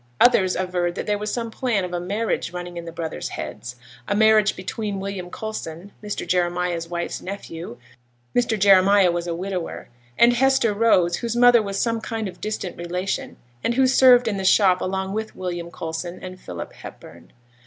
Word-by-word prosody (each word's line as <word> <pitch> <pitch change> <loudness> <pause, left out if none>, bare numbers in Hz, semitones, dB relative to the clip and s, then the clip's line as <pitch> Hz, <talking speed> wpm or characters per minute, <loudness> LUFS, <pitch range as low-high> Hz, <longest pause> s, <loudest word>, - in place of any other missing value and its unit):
Others 190 -7 +5
averred 180 -2 -1
that - - -4
there 210 -1 0
was 210 0 -3
some 230 -2 -3
plan 220 -5 0
of 180 - -7
a 175 - -1
marriage 200 +1 -2
running 175 0 -6
in 170 0 -6
the 165 - -7
brothers' 165 -1 -5
heads 120 +1 -6 0.3
a 205 - 0
marriage 215 0 +4
between 200 +2 -4
William 195 -2 -5
Coulson, 200 -3 -6
Mr. 205 -1 -4
Jeremiah's 175 -1 0
wife's 170 0 -4
nephew 170 -8 -7 0.6
(Mr. 235 -2 +2
Jeremiah 195 -1 +5
was 175 0 -3
a 170 - -2
widower), 185 -1 -5 0.3
and 240 +1 +6
Hester 265 -3 +3
Rose, 185 -6 +3
whose 235 -1 -3
mother 245 -1 +6
was 200 -2 -3
some 230 -1 0
kind 225 -2 -3
of 180 -1 -10
distant 210 -4 -4
relation, 180 +3 -3 0.3
and 235 - 0
who 265 +1 +4
served 255 -2 +6
in 205 -3 -1
the 195 - -3
shop 190 -1 +4
along 190 +1 -2
with 220 +1 -4
William 175 -2 -4
Coulson 165 +2 -5
and 185 0 -9
Philip 85 -2 -7
Hepburn. - - -12
190 Hz, 180 wpm, -23 LUFS, 175-220 Hz, 0.6 s, and